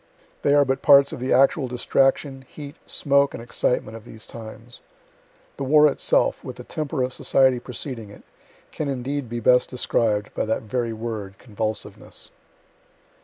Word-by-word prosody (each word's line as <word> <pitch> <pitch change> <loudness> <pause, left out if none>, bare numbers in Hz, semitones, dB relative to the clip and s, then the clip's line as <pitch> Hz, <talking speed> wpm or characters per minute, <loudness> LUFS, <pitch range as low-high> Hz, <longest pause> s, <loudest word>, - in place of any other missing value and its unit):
They 145 - +3
are 145 -1 +5
but 135 0 -1
parts 140 -1 +6
of - - -6
the 130 +2 -3
actual 135 +1 +3
distraction, 135 +2 0
heat, 145 0 -10
smoke 140 0 +2
and 115 - -8
excitement 115 -1 -1
of 115 - -10
those 110 -1 -10
times. 115 +1 -10 0.8
The - - -4
war 150 +3 +6
itself, 145 - +1
with - - -7
the - - -10
temper 150 -3 -3
of 130 0 -3
society 130 -2 +3
preceding 120 -3 -6
it, 100 - -14 0.5
can 155 - -4
indeed 135 0 -3
be 120 0 -3
best 125 +2 +3
described 110 -4 0
by - - -1
that 110 +1 -1
very 115 +2 -2
word 110 -4 -6
convulsiveness. 110 -2 -6
125 Hz, 160 wpm, -23 LUFS, 115-140 Hz, 0.8 s, parts